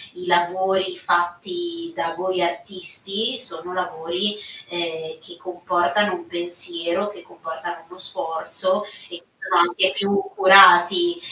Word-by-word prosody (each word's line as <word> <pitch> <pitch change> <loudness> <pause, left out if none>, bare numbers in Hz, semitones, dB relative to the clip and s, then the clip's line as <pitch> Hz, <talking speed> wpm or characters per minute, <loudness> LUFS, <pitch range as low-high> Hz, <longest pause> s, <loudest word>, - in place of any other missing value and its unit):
i 180 - -9
lavori 185 +1 +1
fatti 335 - -2
da 165 0 -2
voi 185 +1 -2
artisti 195 +6 -3
sono 180 -8 -8
lavori, 180 +3 -2 0.3
ehm, 160 -2 -5
che 170 +1 -13
comportano 180 +2 0
un 175 -1 -10
pensiero, 175 +2 -3
che 205 - -12
comportano 165 +1 -8
uno 180 - -15
sforzo 185 +3 -3 0.3
e 175 -1 -10 0.2
sono 185 -2 +2
anche 190 +2 +2
più 200 0 0 0.2
curati. 195 - +7
180 Hz, 115 wpm, -22 LUFS, 175-195 Hz, 0.3 s, curati